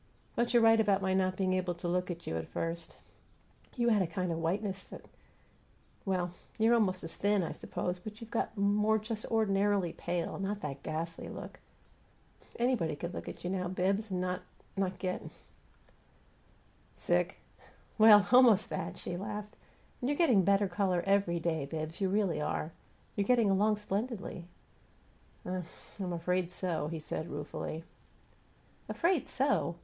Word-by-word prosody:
But 235 0 +1
you're 240 -1 +5
right 225 0 +7
about 200 -3 +3
my 190 0 +2
not 185 -1 +1
being 185 -1 +1
able 185 -1 0
to 175 - -5
look 180 +1 0
at 170 -1 -5
you 80 - -3
at 80 0 -3
first. 165 0 -4 0.8
You 240 -1 +2
had 215 -3 +4
a 185 - +1
kind 180 -1 -2
of 165 - -2
whiteness 190 +4 -1
that - - -11 1.0
Well, 180 -3 0 0.3
you're 225 +1 +4
almost 190 -6 +2
as 165 - -5
thin, 205 -1 +2
I 165 - -3
suppose, 180 0 -3
but 210 +3 -9
you've 230 -1 -10
got 230 - -1
more 210 +2 +3
just 215 0 -4
ordinarily 200 -4 +2
pale; 175 +1 -3
not 200 +1 -2
that 140 -2 -5
ghastly 165 +1 -4
look. - - -8 1.0
Anybody 235 - +1
could 170 +4 -5
look - - -5
at - - -9
you 175 - -2
now, 185 -1 -1
Bibbs, 195 +4 0
and 185 -1 -1
no 180 0 -1 0.4
not 190 -2 -1
get 185 -1 -2 0.9
" - - -33
"Sick?" - - +1 0.6
"Well 210 -2 +9
almost 245 -5 +6
that!" - - -3
she 175 - -3
laughed. 210 +2 -5 0.5
"And 250 - 0
you're 290 - 0
getting 265 - +5
a - - +6
better 200 +2 +4
color 185 -1 0
every 195 -3 +2
day, 160 -3 -1
Bibbs; 160 +4 -5
you 190 - +2
really 195 -5 +1
are. 155 +1 -2 0.4
You're 200 -1 0
getting 235 -5 +5
along 210 +2 +3
splendidly." 210 -3 -3 1.0
"I 185 0 -2 0.4
I'm 185 -2 -2
afraid 180 +1 0
so," 175 -5 -2
he 165 +1 -4
said, 160 +1 -4
ruefully. 150 +2 -5 1.1
"'Afraid 345 0 +1
so'! 265 -10 +1
190 Hz, 165 wpm, -32 LUFS, 175-210 Hz, 1.1 s, Well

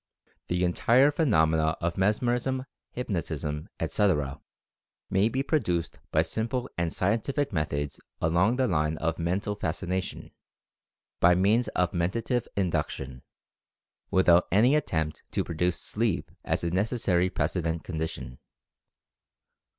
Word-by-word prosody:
The 90 +1 0
entire 120 +10 +4
phenomena 80 - +2
of 85 0 -1
mesmerism, 120 +6 +1 0.2
hypnotism, 80 -9 -3
etc., 75 -10 0 0.7
may 100 +3 +3
be 130 +3 -1
produced 90 - -1
by 80 - +3
simple, 115 +8 -2 0.2
scientific 115 - 0
methods 75 -3 -2 0.2
along 85 +8 +2
the 130 0 +2
line 75 -3 0
of 85 +1 -2
Mental 95 +5 -1
Fascination, 95 0 -3 0.9
by 90 0 +6
means 105 +7 +3
of 90 -1 +2
Mentative 110 +8 -1
Induction, 70 -8 -2 0.9
with 95 0 +2
out 85 +1 +6
any 120 +9 +5
attempt 80 - -1
to - - +1
produce 85 +1 -1
"sleep" - - -1
as - - -1
a 85 - 0
necessary 95 -2 +1
precedent 80 0 -1
condition. 80 -7 -5
90 Hz, 110 wpm, -28 LUFS, 80-110 Hz, 0.9 s, by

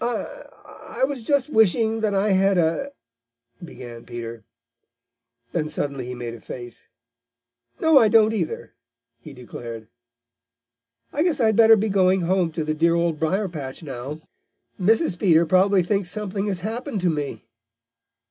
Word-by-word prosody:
"I - - -4 0.2
I - - -7
was 270 -2 0
just 275 +3 +1
wishing 220 -1 +3
that 215 -2 0
I 200 +2 +2
had 195 0 +3
a 170 - 0 0.4
" 115 +3 -23
began 120 -8 -10
Peter. 115 -1 -8 1.1
Then 155 -2 -2
suddenly 140 -4 -3
he 125 - -5
made 120 -1 -6
a 115 - -11
face. 120 -2 -10 0.9
"No, 320 -3 +6
I 225 - +5
don't 220 0 +4
either!" 175 -7 -4 0.5
he 145 - -12
declared. 120 -3 -9 1.2
"I 290 - -1
guess 335 -3 +1
I'd 220 -3 +3
better 225 0 +7
be 215 +1 0
getting 190 -1 +3
home 175 -1 +1
to 160 - -2
the 155 0 -1
dear 165 +2 +2
Old 170 -2 0
Briar 190 +6 0
patch 145 -3 -7
now. 140 +1 -6 0.6
Mrs. 210 - +2
Peter 170 -4 +4
probably 185 +2 +3
thinks 195 0 -1
something 205 -1 -3
has 190 -3 -2
happened 225 - -4
to 175 -1 +2
me." 145 -8 -5
180 Hz, 155 wpm, -23 LUFS, 145-220 Hz, 1.2 s, better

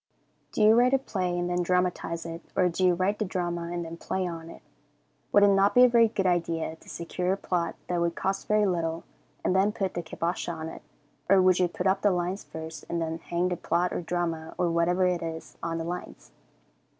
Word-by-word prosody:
Do - - +1
you 215 +1 +7
write 250 +3 +5
a - - +5
play 185 -9 -2
and 175 0 -1
then 180 0 0
dramatize 175 -2 0
it, 165 0 -6
or 180 -1 +3
do 175 +2 -2
you 180 -1 +5
write 190 +4 0
the - - +1
drama 175 -2 -3
and 175 -1 -3
then 165 +1 -7
play 190 +2 -2
on 165 -2 -6
it? - - -12 0.7
Would 205 - +6
it 205 - +7
not 195 +2 +3
be 250 - +8
a - - +9
very 235 -1 +5
good 205 -3 -2
idea 165 -3 0
to - - -17
secure 180 +2 -2
a - - -2
plot 170 -4 -1
that 175 -1 -1
would 170 0 0
cost 195 +1 -2
very 210 0 +3
little, 165 -3 -1 0.4
and 185 - +2
then 195 +2 +3
put 195 -3 -2
the 175 - -2
kibosh 170 +2 -3
on 160 -1 -4
it, - - -10 0.5
or 195 0 +6
would 185 -1 +4
you 180 - +4
put 180 +1 -5
up 190 0 +2
the 205 - +4
lines 180 +1 -1
first, 160 0 -8
and 170 - -1
then 165 0 -3
hang 175 +2 -1
the 180 - -1
plot 175 +2 0
or - - -2
drama, 165 -2 -3
or 175 -2 +1
whatever 175 +2 +2
it 180 -1 +1
is, 165 -1 -6
on 165 0 -2
the 165 - -3
lines? 175 - -7
175 Hz, 235 wpm, -27 LUFS, 170-190 Hz, 0.7 s, a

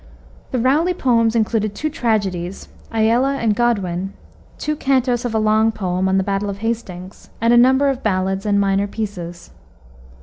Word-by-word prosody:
The 255 - -2
Rowley 295 +9 +2
poems 230 -6 +2
included 215 -2 0
two 310 0 -2
tragedies, 195 - -2 0.2
Aella 235 +5 +2
and 220 -4 +1
Goddwyn, 195 -5 -1 0.4
two 305 0 -2
cantos 260 -4 +1
of 230 -2 -2
a - - +3
long 215 +1 +3
poem 185 -2 -1
on 190 - +2
the 190 - +2
Battle 200 +1 -2
of 200 - -5
Hastings, 200 -5 -5
and 230 +1 +3
a - - +6
number 260 +3 +5
of 270 -2 -1
ballads 190 0 -1
and 200 -1 +2
minor 200 0 +1
pieces. 180 -5 -6
220 Hz, 165 wpm, -19 LUFS, 195-240 Hz, 0.4 s, a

